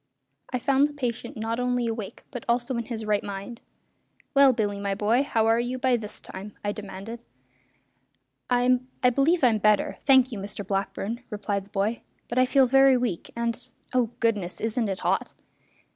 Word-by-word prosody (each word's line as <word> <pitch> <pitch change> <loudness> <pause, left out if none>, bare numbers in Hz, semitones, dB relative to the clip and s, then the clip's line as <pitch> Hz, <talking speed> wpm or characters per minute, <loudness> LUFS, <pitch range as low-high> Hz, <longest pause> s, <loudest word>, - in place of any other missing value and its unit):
I 255 - 0
found 275 +3 +3
the - - -11
patient 245 -2 -4
not 225 +2 -2
only 250 -1 0
awake 225 -3 -5
but 245 -4 -6
also 240 +2 +1
in 235 -1 -2
his 225 -2 -5
right 210 -1 +1
mind. 200 +4 -7 0.7
"Well, 275 -1 +7
Billy, 205 -4 -1
my 200 -1 -1
boy, 215 +5 +2
how 230 -5 +1
are 225 +1 +4
you 245 +2 -2
by 255 -1 +2
this 210 -3 -5
time?" 195 +2 -9
I 205 - +1
demanded. 205 +3 -8 1.3
"I 250 0 +3 0.3
believe 295 +5 +2
I'm 230 -4 +4
better, 210 0 +2
thank 260 -1 +6
you, 220 - -5
Mr 200 +1 -6
Blackburn," 200 +4 -2
replied 205 -2 -3
the - - -22
boy; 210 +3 -1 0.3
"but 240 - +1
I 255 - +4
feel 270 0 +5
very 270 +1 +5
weak 235 -9 -2
and 235 +1 -2 0.3
oh, 250 -3 +2
goodness! 210 -6 0
isn't 225 0 -1
it 190 - -3
hot?" - - 0
230 Hz, 175 wpm, -26 LUFS, 205-250 Hz, 1.3 s, Well